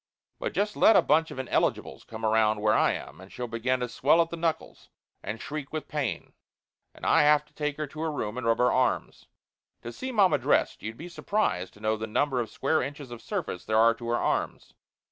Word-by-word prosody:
But - - -3
just 210 +1 -1
let 220 - +6
a - - +6
bunch 160 +2 +3
of - - -9
ineligibles 130 -1 -1
come 110 0 -6
around 110 -1 +2
where 105 0 +2
I - - +3
am, - - -8
and 95 - -14
she'll 125 - -5
begin 120 +3 -1
to 125 - -1
swell 140 +7 +2
at 165 0 +2
the - - -3
knuckles 165 -1 -3 0.3
and 110 +3 -5
shriek 150 +1 -6
with 155 -1 -5
pain. 145 -5 -3 0.6
And - - -9
I - - +5
have 150 0 +4
to - - -30
take 150 -1 -3
her 155 - -2
to 155 +2 -9
her 160 -1 -1
room 105 -7 -4
and 125 -2 -3
rub 115 0 +3
her 125 - +3
arms. 130 0 -1 0.6
To 120 - -7
see 260 - -5
mamma 200 -6 +3
dressed - - +1
you'd 110 +1 -6
be 170 - -8
surprised 175 - -2
to - - -17
know 110 +1 0
the 110 +1 -5
number 130 +4 0
of 115 -3 -2
square 150 +8 0
inches 140 -1 -6
of 120 -1 -8
surface 90 - -4
there 110 0 +1
are 115 +1 +6
to 115 0 -9
her 120 - +1
arms. - - -2
130 Hz, 230 wpm, -27 LUFS, 110-155 Hz, 0.6 s, let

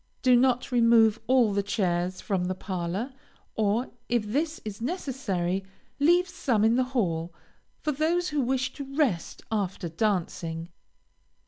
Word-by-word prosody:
Do 255 -2 +6
not 250 +1 +2
remove 230 -2 +5
all 245 -4 +4
the 200 - +2
chairs 185 -2 -1
from 190 -3 -1
the 185 +1 -2
parlor; 185 +7 -3 0.4
or, 220 +3 0 0.2
if 240 -3 +1
this 305 +9 -1
is 210 0 -6
necessary, 230 - -2 0.4
leave 350 +5 +4
some 275 - 0
in 225 +1 +4
the 255 - +3
hall, 170 -7 0 0.5
for 305 - 0
those 325 +5 +1
who 295 -1 0
wish 255 0 0
to 275 -1 -8
rest 250 - 0
after 195 -4 -2
dancing. 165 -3 -2
225 Hz, 140 wpm, -27 LUFS, 185-265 Hz, 0.5 s, Do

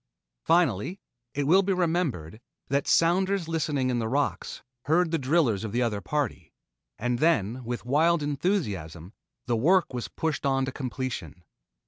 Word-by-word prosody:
Finally, 165 - +1 0.4
it 145 - 0
will 180 +7 +5
be 195 0 0
remembered, 160 - -1 0.3
that 140 +1 0
sounders 185 +1 +2
listening 150 -5 0
in 120 - 0
the 110 - -1
rocks 140 +5 -2 0.2
heard 165 +2 +2
the 165 - +1
drillers 130 - +1
of 110 - -4
the 125 +1 +1
other 105 -4 -1
party, 115 - -3 0.5
and 120 +3 -1
then 130 - +1
with 120 0 -5
wild 155 +5 +3
enthusiasm 105 - -2 0.3
the 120 - 0
work 170 +8 +3
was 120 -1 -3
pushed 160 -3 -3
on 135 -1 +1
to 135 - -4
completion. 125 - -5
140 Hz, 150 wpm, -27 LUFS, 115-165 Hz, 0.5 s, will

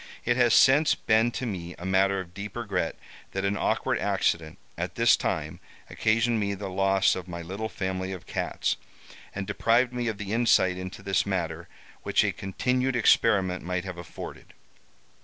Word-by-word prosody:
It 120 - +2
has 120 -2 +4
since 145 +4 +5
been 110 +1 +2
to 130 - -3
me 90 -6 -5
a 90 - -8
matter 95 +1 +2
of 90 -2 -8
deep 100 +2 -7
regret 115 -4 -2 0.4
that 95 0 -1
an 100 +1 +1
awkward - - 0
accident, 80 -2 0 0.2
at - - -4
this - - +5
time, - - -3 0.3
occasioned 115 +1 +1
me 100 -1 -1
the 100 0 -6
loss 95 0 +3
of 90 -1 -6
my 85 -1 -6
little 100 +6 -4
family 95 -2 -3
of 95 -3 -7
cats, - - -2 0.6
and 95 -1 -3
deprived 120 +5 +2
me 120 -1 -2
of 110 -2 -2
the 100 0 -4
insight 115 -6 +3
into 95 +2 -7
this 95 0 +1
matter 85 -3 -2 0.3
which - - +2
a - - +1
continued 125 +7 -1
experiment 100 -6 +3
might 90 +1 -2
have 90 -2 -6
afforded. 85 - -9
95 Hz, 175 wpm, -27 LUFS, 95-115 Hz, 0.6 s, since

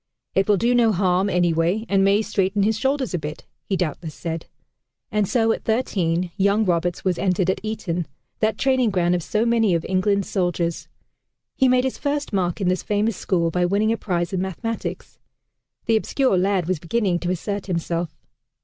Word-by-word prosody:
"It 195 0 +2
will 205 - +5
do 235 +5 +2
no 235 -2 +4
harm, 185 0 +2
anyway, 175 +3 +1
and 195 -1 +3
may 200 +2 +3
straighten 195 0 0
his 220 +2 +2
shoulders 265 +1 -1
a 175 - 0
bit," 150 +1 -7 0.2
he 195 - -1
doubtless 160 -2 -3
said. 165 -1 -5 0.6
And 210 -2 +1
so 225 0 +2
at - - -2
thirteen, 180 -7 0
young 200 +2 +3
Roberts 175 0 0
was 180 -2 +1
entered 185 -1 +2
at - - -4
Eton, 180 -7 -3 0.3
that 215 -1 +1
training 260 -3 +2
ground 180 -3 +1
of 180 - 0
so 215 +7 0
many 225 -5 +3
of 165 - -2
England's 195 +1 +1
soldiers. 175 -3 -1 0.7
He 265 - +3
made 255 0 +4
his 265 - -2
first 290 -3 -2
mark 180 -2 0
in 195 - 0
this 185 0 +1
famous 210 +1 0
school 170 -3 0
by 180 +1 +1
winning 200 +5 +2
a 230 - 0
prize 175 -3 -2
in 185 - 0
mathematics. 215 +5 -5 0.7
The 225 -1 +3
obscure 260 +1 +1
lad 185 -1 +1
was 185 -3 0
beginning 180 +1 0
to 175 - -3
assert 200 +3 -3
himself. 170 -2 -2
190 Hz, 185 wpm, -22 LUFS, 175-220 Hz, 0.7 s, will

